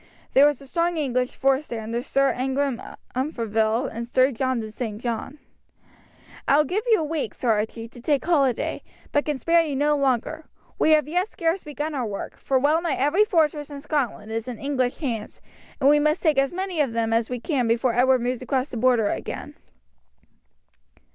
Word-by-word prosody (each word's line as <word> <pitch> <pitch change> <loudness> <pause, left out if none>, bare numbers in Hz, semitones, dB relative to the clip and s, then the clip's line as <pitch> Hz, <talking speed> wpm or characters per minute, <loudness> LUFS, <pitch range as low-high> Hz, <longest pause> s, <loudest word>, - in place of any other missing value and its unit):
There 280 +2 +7
was 295 -3 0
a 275 - -13
strong 340 +4 0
English 255 -4 -1
force 270 +2 +1
there 225 -2 -5
under 230 +2 -3
Sir 275 +1 +2
Ingram 265 0 -1 0.3
Umfraville 230 -4 0
and 235 +1 -6
Sir 255 +2 +3
John 260 0 -1
de 220 -1 -6
St. 215 -2 -5
John. 235 +4 -4 1.1
"I 280 - +5
will 300 - +5
give 365 +9 -1
you 440 -7 +5
a - - -1
week, 310 -1 -3
Sir 245 - +1
Archie, 220 +2 -2
to 240 0 -13
take 285 +2 0
holiday, 275 -8 +1 0.3
but 290 - +1
can 300 -2 -1
spare 335 +6 +3
you 305 -4 -2
no 295 +2 +2
longer. 280 +3 0 0.3
We - - +3
have 305 -2 +4
as 300 - -9
yet 360 +3 +1
scarce 340 -2 -1
begun 300 +1 -4
our 255 -5 -2
work, 200 -2 -6
for 270 - +1
well 295 +5 +3
nigh 335 -5 0
every 310 +10 +3
fortress 310 - +1
in 285 -1 -7
Scotland 275 -7 -2
is 225 +1 -3
in 245 -3 -5
English 260 -1 -1
hands, 230 -8 -4 0.4
and 270 - +3
we 295 +1 +6
must 305 +1 +1
take 305 -5 +3
as 275 0 +1
many 370 -2 -2
of 265 -6 0
them 225 -1 0
as 225 0 +1
we 250 -1 -3
can 255 -3 0
before 235 +2 +2
Edward 255 +1 +3
moves 245 +1 -2
across 260 +1 -1
the 245 - -6
Border 235 -3 +3
again." - - -5
270 Hz, 200 wpm, -24 LUFS, 240-300 Hz, 1.1 s, There